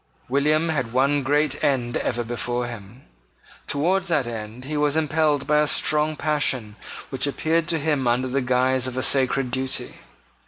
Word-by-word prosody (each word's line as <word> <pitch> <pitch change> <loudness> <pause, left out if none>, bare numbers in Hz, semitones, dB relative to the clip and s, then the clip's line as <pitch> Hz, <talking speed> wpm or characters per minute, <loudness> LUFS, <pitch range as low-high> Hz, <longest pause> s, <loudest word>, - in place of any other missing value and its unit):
William 150 +5 +1
had 130 -7 -2
one 140 +3 +2
great 145 +1 0
end 120 -4 0
ever 120 - -2
before 120 +1 -2
him. 120 +1 -10 0.6
Towards 180 +6 0
that 150 -6 +1
end 115 +1 -7
he 150 +2 -4
was 150 0 +1
impelled 155 -2 +1
by 150 0 +3
a 150 - +2
strong 155 +1 +2
passion 135 -8 -1 0.4
which 135 +1 0
appeared 160 +3 0
to 170 - +1
him 145 -4 0
under 125 +2 +1
the 135 +2 -1
guise 130 +1 +1
of 130 0 -6
a 130 - 0
sacred 135 -1 +3
duty. 130 +1 -1
135 Hz, 165 wpm, -23 LUFS, 125-150 Hz, 0.6 s, by